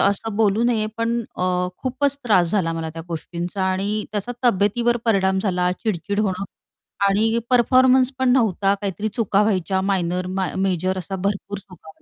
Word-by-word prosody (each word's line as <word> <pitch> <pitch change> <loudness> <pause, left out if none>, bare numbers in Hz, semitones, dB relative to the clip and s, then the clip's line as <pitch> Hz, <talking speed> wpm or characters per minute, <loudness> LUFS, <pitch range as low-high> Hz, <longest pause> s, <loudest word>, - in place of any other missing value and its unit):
असं 200 +2 0
बोलू 215 0 +2
नये, 225 -3 +1
पण 230 +1 0 0.2
अ, 180 0 0
खूपच 270 +2 0
त्रास 180 -7 +3
झाला 180 -5 +1
मला 165 -1 -4
त्या 165 +1 -8
गोष्टींचा 175 +3 -4
आणि 200 +3 -1
त्याचा 215 +3 -3
तब्येतीवर 235 +2 +2
परिणाम 190 -4 +2
झाला 180 -3 +1
चिडचिड 205 -1 -1
होणं 195 -2 -1 0.6
आणि 220 +3 +2
परफॉर्मन्स 255 +1 +4
पण 260 0 +2
नव्हता, 205 -5 +2
काहीतरी 200 +1 -3
चुका 205 -2 +1
व्हायच्या 190 -2 0
मायनर, 180 -1 -1
म 190 +1 -3 0.2
मेजर 185 0 0
अशा 190 +2 -5
भरपूर 200 +1 -3
चुका 180 -5 -15
200 Hz, 155 wpm, -22 LUFS, 185-225 Hz, 0.6 s, परफॉर्मन्स